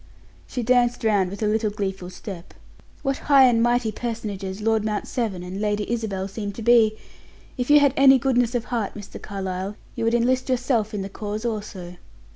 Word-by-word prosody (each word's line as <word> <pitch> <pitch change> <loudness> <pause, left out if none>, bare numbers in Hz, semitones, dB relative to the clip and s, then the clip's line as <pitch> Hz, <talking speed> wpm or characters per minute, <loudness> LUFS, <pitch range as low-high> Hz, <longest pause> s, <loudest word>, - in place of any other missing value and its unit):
She 245 - -3
danced 245 0 +2
round 205 -4 +2
with 200 +3 -6
a - - +2
little 215 0 +1
gleeful 195 -3 -4
step. 185 -1 -9 0.5
"What 275 -1 -1
high 275 -2 +8
and 235 -2 +4
mighty 240 -1 +2
personages 210 -4 -5
Lord 220 0 +1
Mount 215 -1 -2
Severn 210 -8 -2
and 185 +3 -6
Lady 210 -1 -1
Isabel 205 -5 -2
seem 205 +1 -5
to 225 - -7
be! 225 -2 +5 0.6
If 250 +1 -3
you 295 0 +8
had 280 -2 +4
any 270 -1 +7
goodness 245 -2 +1
of 240 - 0
heart, 230 -5 -3
Mr. 205 -2 -9
Carlyle, 190 0 -4 0.2
you 230 - -4
would 230 +1 +2
enlist 255 +3 +1
yourself 240 -4 0
in 200 - -2
the - - -4
cause 210 +2 -5
also." 200 -6 -5
220 Hz, 190 wpm, -23 LUFS, 200-240 Hz, 0.6 s, high